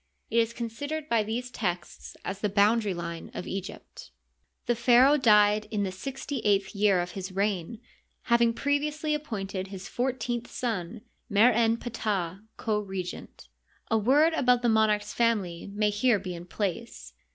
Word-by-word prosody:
It 230 - 0
is 230 0 +2
con 235 0 -4
sidered 285 +6 -5
by 230 -4 +2
these 235 +4 -4
texts 180 -6 -4
as 195 0 -4
the 210 - 0
boundary 205 0 +3
line 170 -1 -6
of - - -5
Egypt. 190 - -7 0.6
The 240 - +2
pharaoh 245 +4 +5
died 210 -5 +4
in 210 -2 -1
the 190 - -2
sixty 270 +7 -5
eighth 200 -2 +1
year 200 -2 +3
of 175 - -5
his 190 -1 -6
reign, 195 +1 -2 0.4
having 235 -1 +3
previously 300 +3 0
appointed 195 -10 -4
his 190 +1 -8
fourteenth 245 -1 -2
son, 220 -3 -3 0.3
Mer 220 +4 +5
en 230 0 +2
Ptahy 200 -7 -3 0.2
co 215 -2 0
regent. 190 - -7 0.4
A 225 - +4
word 290 +9 +4
about 250 -5 +3
the 240 - +3
monarch's 215 -1 +2
family 200 -8 0
may 210 +1 +1
here 215 +2 +3
be 185 -2 -6
in 175 +1 -9
place. 170 - -4
215 Hz, 160 wpm, -28 LUFS, 195-240 Hz, 0.6 s, pharaoh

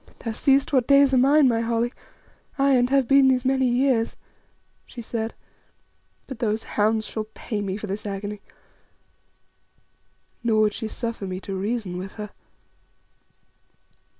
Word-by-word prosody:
"Thou 230 - -5
seest 270 +5 +2
what 255 -3 +3
days 280 -1 +5
are - - +5
mine, 280 +2 +5
my 230 -2 +2
Holly, 230 +1 -1 0.6
aye, 275 0 +3
and 245 -1 +3
have 270 -2 +2
been 275 0 +5
these 255 -1 +2
many 265 0 +2
years," 245 -2 +1 0.7
she 245 - -11
said; 225 -1 -4 0.9
"but 265 -4 -9
those 220 -2 -1
hounds 215 +1 0
shall 215 0 -4
pay 215 -3 -4
me 195 -1 -3
for 215 - -6
this 200 +1 -5
agony." 205 0 -5 2.0
Nor 220 -2 +2
would 210 -1 +2
she 220 - -4
suffer 230 -2 -5
me 185 0 -4
to 195 - -6
reason 195 -2 -3
with 190 +1 -7
her. 210 -1 -7
230 Hz, 150 wpm, -24 LUFS, 210-260 Hz, 2.0 s, days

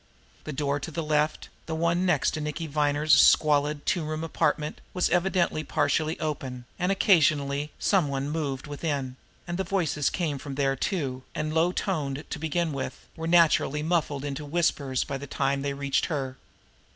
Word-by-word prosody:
The 155 - -4
door 145 0 -1
to 140 - -6
the 160 +1 -3
left, 150 0 0 0.2
the 160 - -2
one 170 +3 +1
next 145 -7 +2
to 155 - -4
Nicky 150 +2 -3
Viner's 150 0 +2
squalid, 150 -1 +4
two 175 - +1
room 155 +1 -3
apartment, 155 -1 -1
was 180 - +1
evidently 175 -3 +1
partially 155 +2 0
open, 130 -6 -4
and 180 +1 +1
occasionally 150 -7 +3
some 190 -7 +2
one 140 0 -2
moved 145 -4 -2
within; 145 -3 -3 0.3
and 175 +1 -3
the - - +1
voices 170 -6 0
came 155 -6 -2
from 140 0 -6
there 135 -1 +1
too, 135 -5 -2
and, 155 0 -2
low 165 +2 +3
toned 150 -7 -2
to - - -3
begin 160 +1 -1
with, 135 - -5
were 165 0 -4
naturally 165 -3 +4
muffled 155 -4 0
into 145 +1 -4
whispers 145 -4 0
by 135 -1 -4
the 140 - -7
time 140 +1 0
they 140 0 -2
reached 140 -1 0
her. 135 -5 -3
150 Hz, 175 wpm, -27 LUFS, 140-165 Hz, 0.3 s, squalid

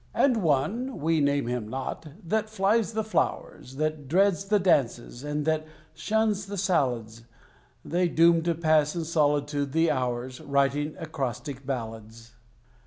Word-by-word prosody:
And 255 -4 +3
One 210 - 0
(we 160 +1 +1
name 140 -1 +1
him 120 -2 -3
not) 135 +6 -5 0.2
that 215 +5 -1
flies 215 +2 +1
the 220 0 -1
flowers, 170 - -2
That 155 -1 -2
dreads 195 +4 +2
the 210 +1 +3
dances, 135 -9 +1
and 145 0 -2
that 155 0 0 0.3
shuns 215 -2 0
the 200 0 -5
salads, 120 - -1 0.6
They 175 +1 +1
doom 170 0 +4
to 170 0 0
pass 155 -2 +2
in 170 - -2
solitude 145 -3 0
the 165 0 +3
hours, 125 -1 -2
Writing 140 +2 0
acrostic 140 -4 -5
ballads. 115 -2 -6
155 Hz, 140 wpm, -27 LUFS, 135-180 Hz, 0.6 s, doom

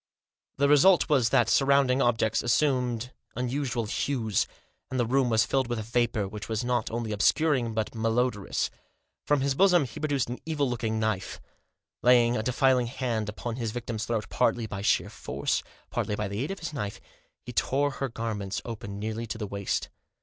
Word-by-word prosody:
The 140 - +3
result 160 +6 +5
was 130 -7 +3
that 120 0 +3
surrounding 135 0 +3
objects 115 -2 +2
assumed 125 -1 +1 0.2
unusual 125 -1 -1
hues, 110 -2 0 0.4
and 130 - -2
the 120 - +2
room 130 +1 +2
was 110 -1 +3
filled 135 -2 +1
with 120 0 -2
a 110 - -3
vapour, 115 -2 0
which 105 +3 -8
was 110 0 -1
not 120 -2 0
only 115 -1 -3
obscuring, 120 +2 +2
but 110 -1 -1
malodorous. 115 -1 0 0.6
From 145 -2 +3
his 140 0 +1
bosom 180 +1 +5
he 125 +5 -9
produced 145 -4 0
an 120 +1 -5
evil 150 -3 0
looking 115 -2 -1
knife. 110 -3 -2 0.6
Laying 120 -1 +5
a 110 - 0
defiling 125 +1 +2
hand 120 -4 -2
upon 115 +3 -5
his 115 -3 -2
victim's 115 -1 -4
throat, 115 -2 -1
partly 115 0 +1
by 100 -2 -5
sheer 100 - +1
force, - - -2 0.3
partly 105 - -1
by 105 0 -2
the 100 +3 -3
aid 145 - -4
of 195 -2 -5
his 165 -2 -5
knife, 105 -8 -4 0.5
he - - -7
tore 145 +2 +1
her 135 0 -3
garments 110 -4 -3
open 105 -4 -6
nearly 110 +2 -4
to 110 - -4
the 110 - -3
waist. 100 -1 -2
120 Hz, 180 wpm, -28 LUFS, 110-135 Hz, 0.6 s, result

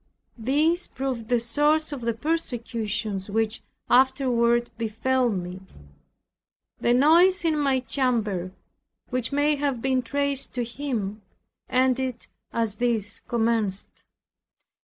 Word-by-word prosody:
This 300 +9 +1
proved 260 -4 -4
the 245 -1 +3
source 295 +7 +2
of 280 -4 -5
the 235 -1 -1
persecutions 225 - -2
which 220 +1 -1 0.3
afterward 245 -2 +3
befell 240 +3 0
me. 185 -2 -4 1.2
The 240 - +2
noise 340 +8 +5
in 320 -1 +3
my 275 -3 +1
chamber, 220 -9 -1 0.6
which 255 -1 -1
may 290 +1 +2
have 280 -3 -1
been 260 +1 +1
traced 280 +2 -1
to 245 - 0
him, 230 -5 -4 0.5
ended 255 -1 +1 0.3
as 225 -3 -1
these 230 -4 -1
commenced. 225 -4 -1
245 Hz, 110 wpm, -25 LUFS, 225-275 Hz, 1.2 s, noise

